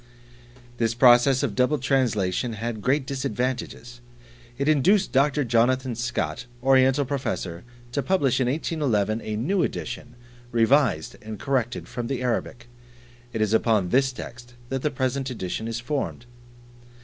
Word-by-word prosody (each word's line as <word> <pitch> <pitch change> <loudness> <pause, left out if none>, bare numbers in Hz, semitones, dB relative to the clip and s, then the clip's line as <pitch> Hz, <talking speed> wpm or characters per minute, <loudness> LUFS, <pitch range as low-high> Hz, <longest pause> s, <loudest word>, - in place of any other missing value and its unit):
This 115 -1 0
process 125 +2 +5
of 125 -7 -1
double 125 +7 +2
translation 120 -5 0
had 110 0 -4
great 135 +4 +1
disadvantages; 125 -1 -3 0.6
it 140 - -1
induced 180 +7 +3
Dr. 145 +2 +2
Jonathan 125 +2 +2
Scott, 120 +1 -3 0.2
Oriental 135 +1 +4
Professor, 125 -10 -3 0.3
to 140 - 0
publish 140 -8 +1
in 130 - +1
1811, 125 -7 0
a 110 - -4
new 170 - 0
edition, 120 -6 -4 0.4
revised 115 - +2
and 110 0 -7
corrected 125 -2 -1
from 120 -1 -5
the 130 -1 -3
Arabic. 120 0 -2 0.6
It 115 - -3
is 110 0 +1
upon 110 -5 +2
this 135 +4 +3
text 120 -1 -10
that 135 -1 -2
the 150 - +1
present 130 -1 -2
edition 110 -2 -4
is 115 0 -3
formed. 125 -1 -3
125 Hz, 135 wpm, -25 LUFS, 115-135 Hz, 0.6 s, process